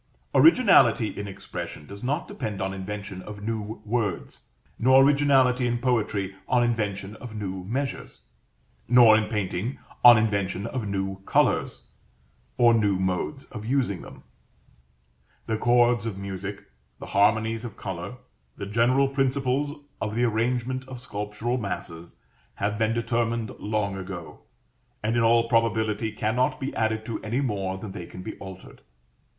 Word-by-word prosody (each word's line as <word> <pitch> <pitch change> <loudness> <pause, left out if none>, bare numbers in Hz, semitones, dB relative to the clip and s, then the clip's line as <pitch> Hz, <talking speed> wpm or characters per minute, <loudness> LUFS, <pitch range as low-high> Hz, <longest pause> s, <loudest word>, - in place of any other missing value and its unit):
Originality 160 - +6
in 100 - -6
expression 95 -5 -7
does 100 +7 -10
not 145 +7 -1
depend 110 -6 -5
on 95 0 -2
invention 95 0 -6
of 100 +1 -9
new 110 -1 -4
words; 105 -5 -2 0.3
nor 130 +2 +6
originality 135 -3 +4
in 120 0 0
poetry 105 -6 0
on 125 -1 +3
invention 105 -4 -2
of 120 -3 -9
new 95 -3 -4
measures; 135 +7 -4 0.7
nor, 120 -2 +7
in 110 -1 +1
painting, 105 +2 -2 0.3
on 120 -2 +10
invention 100 -3 0
of 115 -2 -3
new 95 -1 -2
colors, - - +1 0.7
or 120 -1 +6
new 105 -4 +2
modes 95 +10 -2
of 105 -3 -7
using 120 -6 0
them. - - -12 1.2
The 110 -1 -2
chords 120 -2 +3
of 105 -4 -4
music, 100 0 -6 0.3
the - - -9
harmonies 110 +3 +2
of 115 -4 -7
color, 95 +5 -5 0.4
the 100 - -5
general 120 +6 +3
principles 135 +1 0 0.3
of 105 -1 -2
the 120 - +1
arrangement 120 +3 0
of 130 -2 -8
sculptural 105 +2 -3
masses, 85 -5 -6 0.4
have 105 +2 -2
been 110 0 +2
determined 115 -1 -1
long 105 -2 -1
ago, 95 -3 -7 0.6
and, 110 +2 0
in 120 - +3
all 115 0 +4
probability, 110 -2 +1
cannot 110 +6 0
be 135 -1 -3
added 110 0 0
to 115 - -4
any 115 +5 -1
more 100 -7 -2
than 100 +1 -7
they 90 -3 -7
can 90 - -9
be - - -6
altered. 95 -1 -11
110 Hz, 145 wpm, -26 LUFS, 100-120 Hz, 1.2 s, on